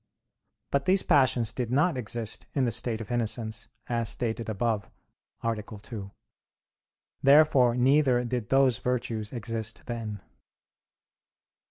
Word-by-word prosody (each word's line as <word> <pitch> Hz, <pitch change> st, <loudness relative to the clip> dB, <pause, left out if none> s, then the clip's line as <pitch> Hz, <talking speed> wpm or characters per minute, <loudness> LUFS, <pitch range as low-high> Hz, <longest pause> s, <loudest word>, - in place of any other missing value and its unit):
But 140 Hz, 0 st, +1 dB
these 190 Hz, +1 st, +4 dB
passions 120 Hz, -5 st, +3 dB
did 120 Hz, -1 st, -3 dB
not 145 Hz, +6 st, +2 dB
exist 115 Hz, -2 st, -3 dB
in 135 Hz, -3 st, +2 dB
the 120 Hz, -, 0 dB
state 115 Hz, 0 st, -1 dB
of 110 Hz, -, -8 dB
innocence, 115 Hz, -1 st, -1 dB, 0.2 s
as 115 Hz, -2 st, -1 dB
stated 115 Hz, -1 st, -3 dB
above 110 Hz, 0 st, -1 dB, 0.5 s
(A. 115 Hz, -2 st, -1 dB
2). 105 Hz, -1 st, -9 dB, 1.1 s
Therefore 140 Hz, -4 st, +5 dB
neither 130 Hz, -1 st, +3 dB
did 120 Hz, -2 st, -3 dB
those 135 Hz, -3 st, +3 dB
virtues 115 Hz, -4 st, -2 dB
exist 115 Hz, -2 st, -4 dB
then. 115 Hz, -4 st, -5 dB
120 Hz, 120 wpm, -28 LUFS, 110-130 Hz, 1.1 s, Therefore